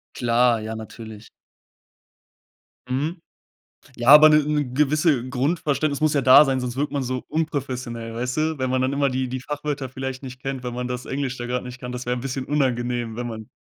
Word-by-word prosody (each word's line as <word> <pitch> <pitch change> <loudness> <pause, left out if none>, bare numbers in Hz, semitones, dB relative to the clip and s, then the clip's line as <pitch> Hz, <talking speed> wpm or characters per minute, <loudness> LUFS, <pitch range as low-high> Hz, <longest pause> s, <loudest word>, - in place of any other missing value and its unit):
Klar, 120 -1 +2
ja, 110 +1 -5
natürlich. 110 -1 -10 1.6
Mhm. 150 +7 -2 0.8
Ja, 120 +1 0
aber 150 +2 +10
'ne 150 0 +5
'ne 150 0 0
gewisse 150 -2 +2
Grundverständnis 145 +2 0
muss 155 -1 +3
ja 140 - +2
da 130 +3 +8
sein, 135 -1 0
sonst 125 -1 -4
wirkt 145 +2 -1
man 140 -1 -1
so 130 0 -3
unprofessionell, 130 -7 -3
weißt 125 +3 -3
du? 155 0 0
Wenn 130 -1 -1
man 130 0 +1
dann 130 +2 0
immer 140 0 +1
die 130 0 -1
die 130 +1 -4
Fachwörter 145 0 -4
vielleicht 130 0 -5
nicht 130 -1 -9
kennt, 135 -2 -4
wenn 125 -1 -4
man 125 0 -3
das 125 0 -5
Englisch 135 -1 -3
da 120 - -5
grad 125 0 -2
nicht 125 0 -9
kann, 125 -1 -6
das 125 0 -6
wäre 125 0 0
'n 120 - -5
bisschen 130 0 -4
unangenehm, 120 -5 -1
wenn 120 0 -4
man 110 -2 -8
130 Hz, 200 wpm, -23 LUFS, 125-145 Hz, 1.6 s, aber